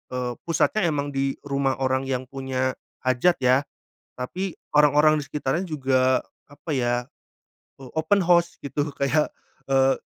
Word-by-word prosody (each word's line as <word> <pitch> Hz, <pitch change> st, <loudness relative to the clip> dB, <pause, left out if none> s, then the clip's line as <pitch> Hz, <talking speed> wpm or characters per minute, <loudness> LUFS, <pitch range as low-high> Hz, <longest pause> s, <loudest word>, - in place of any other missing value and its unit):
eee, 125 Hz, -1 st, -2 dB, 0.2 s
pusatnya 170 Hz, +3 st, +2 dB
emang 145 Hz, -2 st, -1 dB
di 135 Hz, 0 st, -1 dB
rumah 140 Hz, -1 st, 0 dB
orang 130 Hz, 0 st, 0 dB
yang 130 Hz, -1 st, -1 dB
punya 130 Hz, 0 st, -2 dB, 0.3 s
hajat 130 Hz, +8 st, +3 dB
ya, 130 Hz, +1 st, +3 dB, 0.5 s
tapi 180 Hz, +9 st, -4 dB, 0.2 s
orang-orang 150 Hz, +1 st, +5 dB
di 145 Hz, -, -7 dB
sekitarnya 150 Hz, +6 st, -2 dB
juga 130 Hz, -4 st, +2 dB, 0.2 s
apa 145 Hz, +3 st, -9 dB
ya, 120 Hz, -2 st, +1 dB, 0.7 s
o 130 Hz, -2 st, -12 dB
open 190 Hz, +4 st, +2 dB
house 170 Hz, 0 st, +3 dB
gitu 145 Hz, +1 st, -2 dB
kayak, 150 Hz, +2 st, +2 dB, 0.4 s
eee. 135 Hz, 0 st, +3 dB
135 Hz, 135 wpm, -24 LUFS, 130-155 Hz, 0.7 s, orang-orang